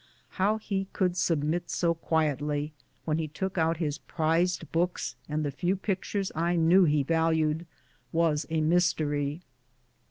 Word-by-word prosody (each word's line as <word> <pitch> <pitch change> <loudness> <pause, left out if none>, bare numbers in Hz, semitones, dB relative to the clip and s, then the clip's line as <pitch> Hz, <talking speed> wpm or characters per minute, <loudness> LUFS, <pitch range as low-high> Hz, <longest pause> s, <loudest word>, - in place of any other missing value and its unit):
How 210 +3 +3
he 195 -3 -3
could 180 -2 +1
submit 165 -1 0
so 170 -1 +1
quietly, 150 -2 -1 0.3
when 155 0 0
he 160 - -1
took 190 +4 -3
out 165 0 +2
his 150 -3 -2
prized 165 0 0
books 175 +2 -1
and 150 0 -1
the 145 - -1
few 175 +7 0
pictures 195 0 -2
I 170 +2 0
knew 175 +3 +5
that - - +3
he 150 -2 +2
valued, 160 +1 +1 0.4
was 160 -3 +1
a 160 -1 0
mystery. 155 -2 +1
165 Hz, 150 wpm, -28 LUFS, 155-175 Hz, 0.4 s, knew